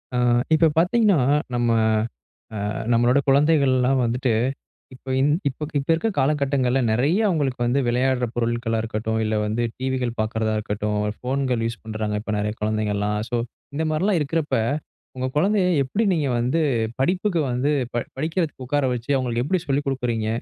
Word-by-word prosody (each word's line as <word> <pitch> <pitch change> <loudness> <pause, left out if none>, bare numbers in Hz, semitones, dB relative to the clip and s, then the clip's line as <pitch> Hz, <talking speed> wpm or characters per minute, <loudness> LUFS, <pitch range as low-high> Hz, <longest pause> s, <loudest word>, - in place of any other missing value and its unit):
ஆ - - +1 0.4
இப்ப 160 +1 +5
பார்த்தீங்கன்னா, 200 +3 +4 0.4
நம்ம 120 -1 +1 1.0
அ - - -2 0.2
நம்மளோட 120 +3 +4
குழந்தைகள்லாம் 135 -3 +3
வந்துட்டு, 120 +1 0 0.6
இப்ப 130 +1 -6
இன் 140 +2 +3 0.2
இப்ப 145 +3 -6
இப்ப 140 - -7
இருக்க 195 +8 0
கால 135 +1 +3
கட்டங்கள்ல 135 -2 +1
நிறைய 135 - +2
அவுங்களுக்கு 145 -9 0
வந்து 125 +4 +2
விளையாடுற 125 +1 +1
பொருட்களா 120 -1 -1
இருக்கட்டும், 110 0 -2
இல்ல 110 0 0
வந்து 110 +3 -1
டிவிகள் 130 -2 -2
பார்க்குறதா 110 0 0
இருக்கட்டும், 105 0 -2 0.2
போன்கள் 130 -2 0
யூஸ் 115 0 -6
பண்றாங்க 110 -1 -3
இப்ப 110 0 -4
நிறைய 105 +1 -1
குழந்தைகள்லாம். 105 -1 -1
சோ 120 - 0 0.4
இந்த 160 - 0
மாரிலாம் 180 +3 +1
இருக்கிறப்ப, 150 +1 -1 0.6
உங்க 130 0 -1
குழந்தையை 190 +2 +2
எப்படி 195 - -1
நீங்க 155 -5 0
வந்து 130 +8 +1 0.4
படிப்புக்கு 180 +3 +1
வந்து 125 +4 0 0.2
ப - - -7 0.2
படிக்கிறதுக்கு 160 -2 -2
உட்கார 145 +2 +1
வச்சு, 120 +2 -8
அவங்களுக்கு 120 -2 0
எப்படி 185 +3 0
சொல்லிக் 140 +1 0
கொடுக்கிறீங்க? 120 -5 -1
130 Hz, 150 wpm, -23 LUFS, 115-150 Hz, 1.0 s, இப்ப